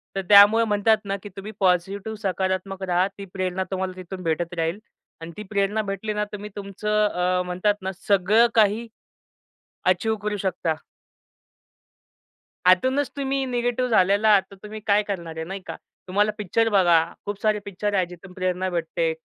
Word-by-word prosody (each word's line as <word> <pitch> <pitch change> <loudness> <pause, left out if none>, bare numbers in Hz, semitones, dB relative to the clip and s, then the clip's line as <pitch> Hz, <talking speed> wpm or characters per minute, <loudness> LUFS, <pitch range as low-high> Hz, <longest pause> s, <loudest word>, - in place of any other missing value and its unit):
तर 195 - 0
त्यामुळं 205 +2 +8
म्हणतात 210 +1 +3
ना 195 0 -2
की 205 - -8
तुम्ही 200 +2 -7
पॉझिटिव्ह 195 +3 0
सकारात्मक 190 +1 -2
राहा. 180 +2 +2
ती 200 0 -10
प्रेरणा 185 0 -2
तुम्हाला 190 0 -2
तिथून 185 0 -8
भेटत 165 +2 -1
राहील 165 +4 -1 0.4
आणि 165 +1 -7
ती 210 - -5
प्रेरणा 205 +1 0
भेटली 200 +1 -4
ना 210 0 -1
तुम्ही 210 +1 -6
तुमचं 210 +1 -1
अ, 180 -1 0
म्हणतात 185 +3 0
ना 190 - -3 0.2
सगळं 205 +4 +4
काही 220 +1 +3 1.0
अचीव्ह 220 +5 +2
करू 210 0 -2
शकता. 180 -4 -1 1.9
आतूनच 260 +10 +3
तुम्ही 270 -1 -1
निगेटिव्ह 245 0 -1
झालेला 205 0 +3
आहात. 205 -2 +6
तर - - -11
तुम्ही 215 +1 -7
काय 205 +1 +4
करणार 170 -5 -5
आहे 160 - -4
नाही 195 +2 -6
का. - - -5 0.3
तुम्हाला 205 +3 +2
पिक्चर 225 +3 +1
बघा, 175 -5 +4 0.2
खूप 205 0 -5
सारे 215 -1 +2
पिक्चर 205 +1 -3
आहे. 190 -2 +2
जिथून 180 +1 -13
प्रेरणा 185 0 -1
भेटते. 330 - -1
200 Hz, 160 wpm, -24 LUFS, 185-210 Hz, 1.9 s, त्यामुळं